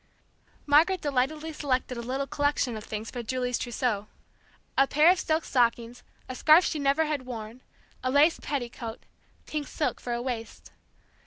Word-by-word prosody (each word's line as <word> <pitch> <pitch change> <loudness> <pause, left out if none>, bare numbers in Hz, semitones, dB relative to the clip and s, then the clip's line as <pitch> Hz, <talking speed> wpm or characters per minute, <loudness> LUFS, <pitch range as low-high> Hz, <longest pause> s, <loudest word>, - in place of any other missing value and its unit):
Margaret 320 +6 +4
delightedly 300 +3 -1
selected 260 -4 -1
a 235 - -4
little 260 +4 -2
collection 285 -4 0
of 215 - -7
things 215 0 -6
for 245 - -4
Julie's 250 +1 -2
trousseau. 235 -4 -2 0.7
A 275 - +4
pair 305 +5 +5
of 370 - +1
silk 315 -2 0
stockings, 235 -1 0 0.3
a 255 - -5
scarf 310 +6 +6
she 310 - -1
never 280 +3 +2
had 290 -4 -3
worn, 230 0 -7 0.4
a 255 - 0
lace 290 +5 +4
petticoat, 240 -4 -5 0.4
pink 300 -2 -4
silk 300 - -2
for 245 - -5
a 235 - -1
waist. 235 -3 -6
260 Hz, 160 wpm, -27 LUFS, 240-300 Hz, 0.7 s, scarf